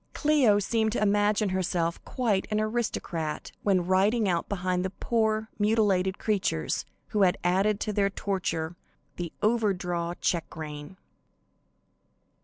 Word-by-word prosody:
Cleo 285 Hz, -9 st, +4 dB
seemed 220 Hz, +2 st, +1 dB
to -, -, 0 dB
imagine 205 Hz, 0 st, +2 dB
herself 175 Hz, -2 st, -1 dB
quite 225 Hz, -7 st, 0 dB
an 215 Hz, 0 st, 0 dB
aristocrat 215 Hz, -8 st, -2 dB
when 190 Hz, -4 st, +2 dB
riding 200 Hz, +4 st, +3 dB
out 170 Hz, -2 st, 0 dB
behind 185 Hz, -2 st, -1 dB
the 190 Hz, -, -1 dB
poor, 220 Hz, +2 st, 0 dB
mutilated 205 Hz, -3 st, +2 dB
creatures, 185 Hz, -, -1 dB, 0.2 s
who 210 Hz, -, 0 dB
had 180 Hz, -2 st, +4 dB
added 195 Hz, +4 st, +2 dB
to 215 Hz, -, -1 dB
their 200 Hz, -1 st, +2 dB
torture 185 Hz, -4 st, -2 dB, 0.4 s
the 175 Hz, -2 st, -4 dB
over 215 Hz, -2 st, +2 dB
draw 175 Hz, -1 st, -3 dB
check 170 Hz, -3 st, -2 dB
rein. 150 Hz, +2 st, -7 dB
195 Hz, 130 wpm, -27 LUFS, 180-215 Hz, 0.4 s, Cleo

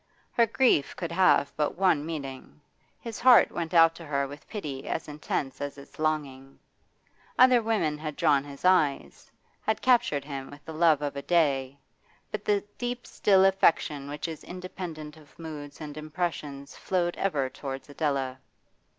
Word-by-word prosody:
Her 235 Hz, -1 st, +3 dB
grief 230 Hz, -, +2 dB
could 170 Hz, -2 st, -5 dB
have 170 Hz, -5 st, +3 dB
but 150 Hz, +2 st, -1 dB
one 180 Hz, -6 st, +3 dB
meaning; 140 Hz, -4 st, -7 dB, 0.4 s
his 230 Hz, -1 st, -7 dB
heart 250 Hz, -1 st, +7 dB
went 170 Hz, -1 st, -4 dB
out 165 Hz, -2 st, +6 dB
to 170 Hz, -, -10 dB
her 140 Hz, -1 st, 0 dB
with 145 Hz, +2 st, -12 dB
pity 145 Hz, -11 st, -6 dB
as 160 Hz, -, -3 dB
intense 145 Hz, -2 st, -4 dB
as 145 Hz, 0 st, -4 dB
its 140 Hz, -, -14 dB
longing. 140 Hz, -4 st, -2 dB, 0.8 s
Other 255 Hz, -1 st, +6 dB
women 210 Hz, -10 st, 0 dB
had 155 Hz, -1 st, -5 dB
drawn 145 Hz, -4 st, +3 dB
his 140 Hz, +3 st, -10 dB
eyes, 150 Hz, -, +1 dB, 0.3 s
had 220 Hz, -, 0 dB
captured 235 Hz, -, +3 dB
him 135 Hz, -2 st, -6 dB
with 145 Hz, +1 st, -14 dB
the 160 Hz, -, -7 dB
love 155 Hz, -2 st, +3 dB
of 145 Hz, -1 st, -3 dB
a 140 Hz, -, -4 dB
day; 140 Hz, -5 st, +1 dB, 0.5 s
but 210 Hz, -1 st, -4 dB
the 205 Hz, -1 st, +2 dB, 0.2 s
deep 245 Hz, 0 st, -3 dB
still 195 Hz, -2 st, +3 dB
affection 160 Hz, -7 st, +2 dB
which 145 Hz, +2 st, -4 dB
is 160 Hz, -2 st, -7 dB
independent 175 Hz, -4 st, -7 dB
of 150 Hz, -2 st, -19 dB
moods 150 Hz, -3 st, -8 dB
and 150 Hz, -2 st, -7 dB
impressions 155 Hz, -3 st, -4 dB
flowed 175 Hz, -2 st, -1 dB
ever 150 Hz, -9 st, 0 dB
towards 135 Hz, 0 st, -7 dB
Adela. 140 Hz, -3 st, -2 dB
155 Hz, 160 wpm, -27 LUFS, 140-180 Hz, 0.8 s, heart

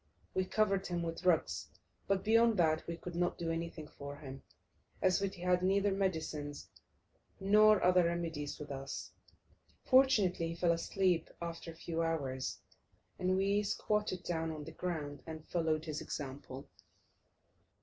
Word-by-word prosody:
We 185 Hz, -, +1 dB
covered 195 Hz, -1 st, +1 dB
him 175 Hz, -1 st, -2 dB
with 165 Hz, +1 st, -4 dB
rugs, 175 Hz, -3 st, +2 dB, 0.4 s
but 195 Hz, -1 st, +1 dB
beyond 230 Hz, 0 st, +4 dB
that 160 Hz, -2 st, +2 dB
we 170 Hz, 0 st, -4 dB
could 175 Hz, +1 st, -7 dB
not 175 Hz, 0 st, 0 dB
do 165 Hz, -1 st, -2 dB
anything 165 Hz, -2 st, -4 dB
for 140 Hz, -1 st, -8 dB
him, 135 Hz, -2 st, -9 dB, 0.6 s
as 185 Hz, +1 st, +3 dB
we 195 Hz, -, +1 dB
had 180 Hz, -1 st, +1 dB
neither 195 Hz, +2 st, +3 dB
medicines 160 Hz, -6 st, -2 dB, 0.7 s
nor 210 Hz, +1 st, +6 dB
other 180 Hz, -1 st, +5 dB
remedies 165 Hz, -4 st, -2 dB
with 145 Hz, -1 st, -7 dB
us. 135 Hz, 0 st, -5 dB, 0.7 s
Fortunately, 215 Hz, -11 st, +4 dB
he 165 Hz, -, -4 dB
fell 170 Hz, 0 st, +2 dB
asleep 175 Hz, 0 st, +1 dB
after 170 Hz, 0 st, -5 dB
a 165 Hz, -, -8 dB
few 165 Hz, 0 st, -3 dB
hours, 140 Hz, -6 st, -1 dB, 0.6 s
and 185 Hz, 0 st, +2 dB
we 200 Hz, +2 st, +2 dB
squatted 210 Hz, -1 st, -1 dB
down 165 Hz, -2 st, -1 dB
on 155 Hz, -2 st, -5 dB
the 160 Hz, -, -8 dB
ground 155 Hz, -4 st, -4 dB
and 160 Hz, -1 st, -7 dB
followed 160 Hz, -2 st, 0 dB
his 155 Hz, -2 st, -3 dB
example. 135 Hz, -1 st, -6 dB
170 Hz, 150 wpm, -34 LUFS, 155-190 Hz, 0.7 s, nor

